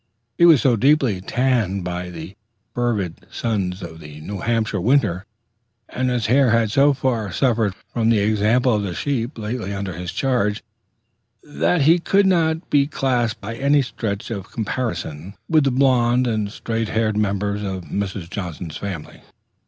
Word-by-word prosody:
He 170 - +5
was 160 -6 +6
so 125 -3 +4
deeply 130 -5 +2
tanned 110 -4 0
by 90 0 -4
the 85 +2 -9 0.4
fervid 105 -8 -2
suns 95 -5 -2
of 80 -1 -8
the 75 -1 -11
New 100 +5 -6
Hampshire 110 -3 0
winter, 105 -4 +1 0.6
and 130 0 -1
his 125 -3 -1
hair 130 +3 +4
had 115 -2 +2
so 140 +4 +5
far 120 -7 -1
suffered 115 -4 +1 0.2
from 115 -1 +1
the 115 - +4
example 110 +4 +2
of 105 - +1
the 95 -4 -4
sheep 130 -2 -2
lately 110 -2 -4
under 95 -1 -4
his 85 +1 -5
charge, 120 -6 0 0.8
that 85 - 0
he 165 +5 +5
could 195 +4 +2
not 165 -2 +1
be 140 -1 +4
classed 125 -6 0
by 110 +3 -6
any 140 +3 +3
stretch 105 -4 -4
of 100 -4 -6
comparison 105 -7 -4
with 155 -3 +3
the - - +4
blonde 125 -1 +3
and 110 -4 -1
straight 115 -1 -3
haired 110 -1 0
members 100 0 -1
of 95 -3 -4
Mrs. 100 -2 -4
Johnson's 85 -4 -6
family. 95 -6 -7
110 Hz, 160 wpm, -21 LUFS, 95-125 Hz, 0.8 s, was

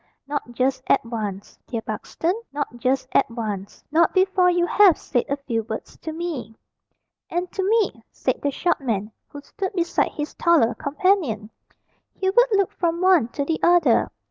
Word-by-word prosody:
"Not 280 -4 -4
just 255 +2 0
at 270 - +3
once, 210 -4 -5
dear 230 -2 -4
Buxton, 275 - -2 0.2
not 285 -4 -4
just 255 +2 0
at 275 - +3
once. 210 -4 -5
Not 330 +4 +3
before 375 -1 +4
you 350 0 +2
have 380 -3 +5
said 245 - -1
a 280 - 0
few 245 -5 -2
words 220 0 -7
to 320 - -5
me." 310 -10 -5 0.7
"And 355 +1 -2
to 390 - -2
me," 395 - +1
said 255 - -2
the 285 - +1
short 315 +3 0
man, 215 -5 -2 0.2
who 290 - -10
stood 385 +6 -5
beside 345 -2 0
his 295 +1 -4
taller 320 -9 +3
companion. 280 - 0 0.6
Hubert 465 +6 +3
looked 395 -2 +2
from 340 -1 -1
one 370 -9 +4
to 280 +4 -3
the 320 +2 -1
other. 345 -9 +4
290 Hz, 170 wpm, -23 LUFS, 235-355 Hz, 0.7 s, have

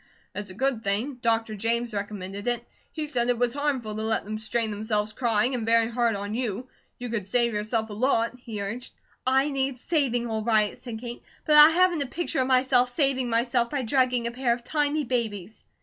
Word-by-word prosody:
"It's 205 -1 -5
a 185 - -10
good 255 -1 0
thing. 230 +7 -1
Dr. 225 -2 +1
James 230 +2 -1
recommended 200 0 -5
it. 240 -1 -1 0.2
He 310 -2 -4
said 245 -5 0
it 245 - +2
was 240 0 +1
harmful 270 -7 -2
to 215 - -4
let 220 -1 -1
them 215 +1 -4
strain 220 0 -1
themselves 210 0 -1
crying, 240 0 +1
and 245 -3 -2
very 230 +1 +3
hard 235 -2 +1
on 205 +1 -4
you. 240 0 -3 0.3
You 245 0 -6
could 215 -5 -3
save 235 +1 +2
yourself 215 +1 -1
a - - -5
lot," 230 +1 +1
he 220 -4 -6
urged. 235 +5 -6 0.3
"I 265 +3 +3
need 270 -1 -1
saving 250 -4 0
all 220 -2 -2
right," 215 -2 +2
said 235 -3 -7
Kate, 240 0 -7 0.2
"but 305 - +2
I 300 +1 +10
haven't 350 -1 +3
a 280 - -1
picture 320 -1 -1
of 255 - 0
myself 255 -1 +3
saving 270 -4 +1
myself 235 +1 +1
by 275 -1 -2
drugging 250 0 +1
a 235 - -1
pair 245 -1 +1
of 240 0 -6
tiny 295 +2 0
babies." 220 -5 -3
235 Hz, 210 wpm, -26 LUFS, 220-260 Hz, 0.3 s, I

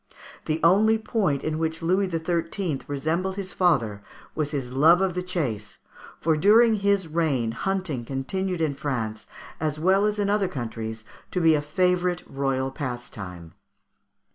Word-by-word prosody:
The 155 +1 0
only 210 +6 +5
point 215 - -1
in 155 0 -2
which 160 +1 -2
Louis 185 +3 +2
XIII. 165 -1 -2
resembled 165 +7 -1
his 195 -2 -5
father 120 - +1 0.3
was 150 -2 -1
his 135 -4 -4
love 160 +6 +6
of 190 -2 +1
the 180 - -2
chase, 125 - -3 0.4
for 160 -1 +2
during 220 +8 +5
his 200 -3 +1
reign 150 -8 0
hunting 180 -2 -2
continued 170 +8 -3
in 155 -3 +1
France, 115 -7 -4 0.3
as 155 -1 -2
well 190 +5 +3
as 210 0 -1
in 205 -1 0
other 200 -1 +2
countries, 110 -6 -5 0.2
to 180 - -1
be 165 -2 +5
a 150 - +2
favourite 180 +3 +1
royal 135 -1 -1
pastime. 105 - -7
160 Hz, 150 wpm, -25 LUFS, 135-185 Hz, 0.4 s, love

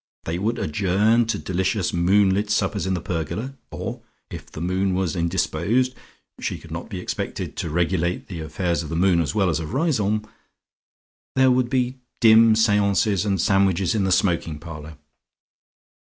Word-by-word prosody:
They 85 +2 -3
would 110 +5 -1
adjourn 105 +8 +2
to 115 - 0
delicious 95 +1 -1
moonlit 95 +3 +3
suppers 100 -2 0
in 95 - 0
the 90 - -3
pergola, 95 - -4 0.2
or 115 +7 -6 0.3
if - - -8
the - - -8
moon 95 +2 0
was 95 -2 -1
indisposed 95 +8 0 0.5
she - - -3
could - - -14
not - - -6
be - - -5
expected - - -4
to - - -3
regulate 85 +2 0
the 90 -4 -7
affairs 85 +3 -2
of 80 - -7
the 80 - -3
moon 90 0 +3
as 80 +5 -2
well 100 -3 +2
as 80 -3 0
of 80 +8 -5
Riseholme 110 -9 +1 1.1
there 130 -1 +5
would 125 -1 +2
be 125 0 -1 0.2
dim 110 0 +6
seances 105 -2 +2
and 100 -2 0
sandwiches 95 -1 +2
in 105 -3 +1
the 95 - 0
smoking 85 -4 +1
parlour. 75 -1 -9
95 Hz, 165 wpm, -23 LUFS, 85-110 Hz, 1.1 s, dim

